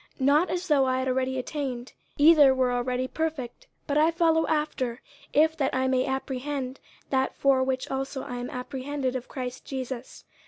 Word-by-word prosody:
50:003:012 260 - -1
Not 300 +6 +4
as 360 +1 -2
though 285 -4 +4
I 255 0 +1
had 260 0 -1
already 260 0 0
attained, 255 -2 -4 0.2
either 290 -3 +7
were 255 -1 +2
already 250 +1 -1
perfect: 320 - -4 0.2
but 290 0 +1
I 315 +2 +5
follow 330 -1 +2
after, 265 -6 -1 0.3
if 315 +2 +4
that 275 -4 0
I 260 0 +1
may 260 0 +1
apprehend 265 0 -3 0.3
that 265 -1 +1
for 270 -1 +3
which 260 0 -2
also 270 0 -3
I 245 - -6
am 245 0 -4
apprehended 260 +1 -3
of 255 -1 -4
Christ 250 -1 -6
Jesus. 260 -2 -6
265 Hz, 180 wpm, -27 LUFS, 255-295 Hz, 0.3 s, either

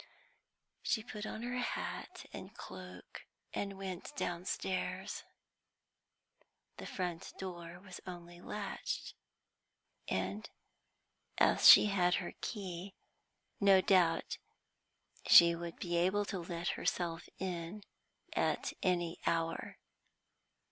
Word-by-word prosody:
She 220 - 0
put 215 -2 -6
on 220 - -5
her 245 +1 -2
hat 245 - -4
and - - -8
cloak, - - -9 0.3
and 200 -1 -3
went 190 +8 -6
downstairs. 185 -2 -2 1.5
The - - -7
front 175 -3 -4
door 175 -2 -7
was 185 -1 -10
only 175 -1 -8
latched, 205 +1 -4 0.9
and, 95 +3 -2 0.9
as - - +7
she - - +11
had 180 -3 +3
her 180 - -3
key, 190 -3 -5 0.6
no 195 -2 +7
doubt 180 -3 +3 0.9
she 170 0 +10
would 170 0 -5
be 175 -1 -1
able 190 +4 +2
to 195 - -3
let 170 0 -3
herself 170 -2 -1
in 185 +2 -4 0.5
at - - +1
any 175 -2 +1
hour. 165 0 -1
180 Hz, 100 wpm, -35 LUFS, 170-195 Hz, 1.5 s, she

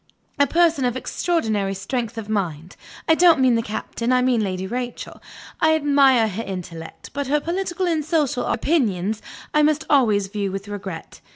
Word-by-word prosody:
A 285 - +5
person 330 -2 +2
of 250 0 0
extraordinary 220 - -1
strength 230 +4 -4
of 220 -2 -5
mind 180 -6 -3 0.3
(I 320 - +6
don't 335 -2 +5
mean 260 -2 +4
the 230 - +2
Captain; 230 +2 -3
I 250 0 +3
mean 250 -3 +2
Lady 185 -1 -3
Rachel); 245 +4 -5 0.4
I 315 0 +4
admire 280 -6 +4
her 215 +2 -4
intellect, 170 -4 -8
but 285 -1 -3
her 295 +2 +2
political 355 +2 -2
and 325 -3 0
social 295 -5 0
opinions 215 - 0 0.3
I 300 - +4
must 305 +1 +2
always 220 -8 +4
view 200 0 -3
with 195 +1 -6
regret. 195 -5 -7
245 Hz, 170 wpm, -22 LUFS, 200-295 Hz, 0.4 s, I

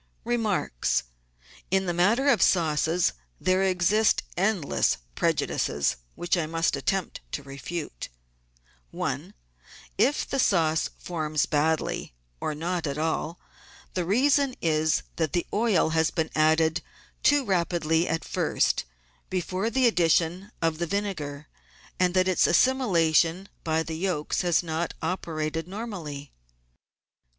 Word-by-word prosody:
Remarks. 215 - 0 0.3
— - - -24
In 190 0 +2
the 175 - -1
matter 215 +11 +3
of 240 -10 +4
sauces 165 0 +2 0.3
there 185 +1 +2
exist 190 +3 +3
endless 190 - +1 0.2
preju - - +1
dices, 70 -3 0 0.2
which 175 +1 0
I 165 -3 -1
must 165 -1 0
attempt 185 +7 -2
to 140 - -3
refute: 140 - -6 0.4
— - - -36
1. - - -4 0.6
If 290 - +2
the 275 - -2
sauce 165 -8 +2
forms 155 -3 -1
badly, 155 - 0 0.2
or 155 - -2
not 170 +1 -2
at 140 0 -3
all, 160 +2 -2 0.5
the 180 - -1
reason 265 - +2
is 155 -1 +1
that 160 -4 -1
the 175 - 0
oil 210 -7 +2
has 160 0 +2
been 160 -1 -2
added 160 +1 +3 0.4
too 290 -2 +4
rapidly 170 -3 +1
at 165 - -2
first, - - 0 0.4
before 185 +3 -1
the 255 +2 +2
addition 175 -1 +2
of 165 -1 +1
the 170 - -1
vinegar, 160 -7 -3 0.5
and 180 0 +2
that 185 0 +3
its 185 - +3
assimilation 175 - +3
by 160 0 +1
the 160 -1 -5
yolks 175 -5 -1
has 175 -1 +2
not 165 0 -3
operated 160 -2 -2
normally. 180 - -6
170 Hz, 130 wpm, -26 LUFS, 155-190 Hz, 0.6 s, of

